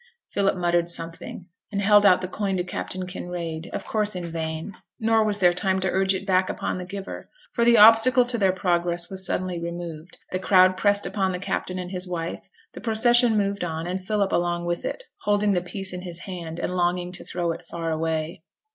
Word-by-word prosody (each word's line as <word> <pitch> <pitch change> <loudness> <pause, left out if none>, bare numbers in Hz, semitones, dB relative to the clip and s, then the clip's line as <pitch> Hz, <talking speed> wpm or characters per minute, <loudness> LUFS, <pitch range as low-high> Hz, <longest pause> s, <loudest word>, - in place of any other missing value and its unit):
Philip 195 -1 +1
muttered 175 -1 +1
something, 165 +1 -5 0.2
and 200 - -2
held 205 0 +6
out 185 -1 +5
the 185 - -3
coin 195 0 -2
to 180 - 0
Captain 185 0 -5
Kinraid, 175 -3 -5
of - - -5
course 210 -2 0
in 175 -2 -5
vain; 160 +3 -4 0.2
nor 225 0 +3
was 210 -1 +2
there 180 -3 +4
time 190 +1 0
to 190 -1 0
urge 190 0 +2
it 190 - -5
back 185 -1 +2
upon - - -3
the 180 - -6
giver, 195 +1 -7 0.2
for 235 - +1
the 235 0 +6
obstacle 225 +4 +7
to 240 -1 -1
their 195 -2 +4
progress 175 -1 0
was 190 -1 0
suddenly 185 -1 -1
removed, 170 -1 -7
the 185 - -1
crowd 185 -1 +5
pressed 205 +1 +1
upon 190 -3 -1
the - - -2
captain 185 0 -3
and 180 0 -5
his 180 -1 -2
wife, 170 -2 -5 0.2
the - - -9
procession 240 0 +3
moved 200 -1 0
on, 160 -1 -3
and 185 +2 -3
Philip 205 0 0
along 175 0 0
with 175 0 -2
it, - - -4 0.2
holding 205 - +2
the 180 - +1
piece 190 +1 -4
in 180 - -5
his 175 -2 -7
hand, 170 -4 -7
and 180 - -3
longing 175 0 0
to 180 - -4
throw 175 -1 -2
it 170 +2 -7
far 165 0 -4
away. 160 0 -2
185 Hz, 210 wpm, -24 LUFS, 175-200 Hz, 0.2 s, obstacle